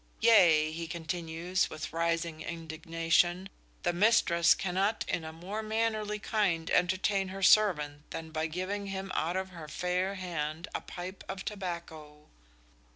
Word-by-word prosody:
"Yea," 170 -9 +6
he 165 +1 -5
continues, 170 +1 -2
with 155 0 -6
rising 165 -1 -1
indignation, 165 +2 0 0.4
"the 175 - +1
mistress 175 -4 +4
cannot 195 +4 0
in 170 - -1
a 160 - -6
more 185 +7 -5
mannerly 215 -1 -1
kind 195 -6 0
entertain 185 +2 +2
her 195 +1 -6
servant 150 -8 +4
than 160 0 -6
by 155 0 -1
giving 185 +5 -3
him 195 0 -4
out 170 +4 0
of 190 0 -3
her 165 -4 -9
fair 180 +5 -1
hand 165 -3 -4
a - - -2
pipe 185 +2 -8
of 190 0 -5
tobacco." 165 -6 -6
175 Hz, 140 wpm, -31 LUFS, 165-195 Hz, 0.4 s, Yea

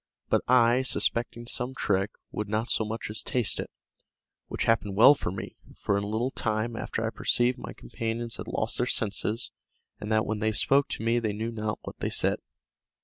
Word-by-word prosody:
But - - +3
I, 125 0 +5
suspecting 120 -2 0
some 125 +2 -1
trick, 95 -3 +1 0.2
would 105 -1 -4
not 110 +2 0
so - - +2
much 110 0 -4
as 110 - -4
taste 125 -4 0
it, - - -4 0.8
which - - -2
happened 110 -3 +1
well 115 +7 +9
for 135 - -3
me; 95 - -7 0.2
for 100 - 0
in 100 - 0
a - - -4
little 115 +5 -1
time 110 0 -1
after 115 0 -3
I 115 - -1
perceived 120 +2 +1
my - - -7
companions 115 - -4
had - - -7
lost 110 - 0
their 125 - +1
senses, 110 +1 0 0.5
and 105 - -5
that 110 0 +3
when 110 0 -2
they 110 0 +1
spoke 140 +6 +4
to - - -4
me 115 +1 +2
they 110 -3 -1
knew 110 +3 -3
not 110 -2 -3
what - - -9
they - - -1
said. - - +1
115 Hz, 200 wpm, -28 LUFS, 105-120 Hz, 0.8 s, well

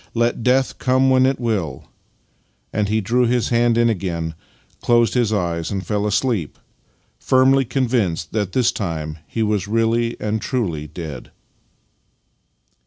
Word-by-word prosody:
Let 120 0 +1
death 130 +3 +1
come 130 +1 +3
when 130 0 +4
it 135 - 0
will," 100 - -2 0.9
and 105 -1 0
he 110 +1 +1
drew 120 +4 +2
his 120 0 +1
hand 120 -1 +2
in 120 0 +4
again, 85 -6 -2 0.5
closed 120 -1 +3
his 120 -4 +1
eyes 85 -5 -1
and 95 -1 -3
fell 105 -1 -1
asleep, 105 - -1 0.6
firmly 130 +1 +3
convinced 115 -10 -1
that 105 -3 -2
this 125 -3 +3
time 80 -5 -4
he 115 - -2
was 105 -2 0
really 115 +2 0
and 105 0 -2
truly 90 - -2
dead. 75 -4 -8
110 Hz, 140 wpm, -20 LUFS, 90-120 Hz, 0.9 s, when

